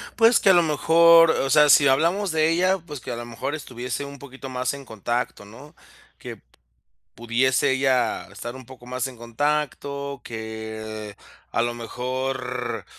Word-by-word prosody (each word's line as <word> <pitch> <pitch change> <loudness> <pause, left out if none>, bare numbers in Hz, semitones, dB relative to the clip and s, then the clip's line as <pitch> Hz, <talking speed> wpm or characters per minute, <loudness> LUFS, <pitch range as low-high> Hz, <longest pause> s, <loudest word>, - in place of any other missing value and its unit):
Pues, 230 +1 +5
que, - - +3
a - - +8
lo 175 -1 +5
mejor, 165 +2 +5
o 135 - -1
sea, 150 +1 +5
si 145 0 +7
hablamos 170 +9 +2
de 160 0 +2
ella, 185 +3 +2
pues, 155 -4 -9
que, - - -7
a - - -3
lo 120 0 -6
mejor, 120 +5 -4
estuviese 125 -2 -5
un 140 0 -10
poquito 135 0 -10
más 130 +1 -2
en 140 -1 -9
contacto, 115 -1 -4
¿no? 125 +8 -14 0.4
Que - - -9
p - - -28 0.7
pudiese 125 +4 +1
ella 130 -1 +1
estar 120 +2 -7
un 130 -2 -12
poco 125 -1 -14
más 125 +1 -3
en 130 -2 -9
contacto, 140 +3 -3
que, 110 -2 -7 0.4
a 115 - +1
lo 120 0 -1
mejor 125 +2 -4
130 Hz, 170 wpm, -23 LUFS, 120-150 Hz, 0.7 s, a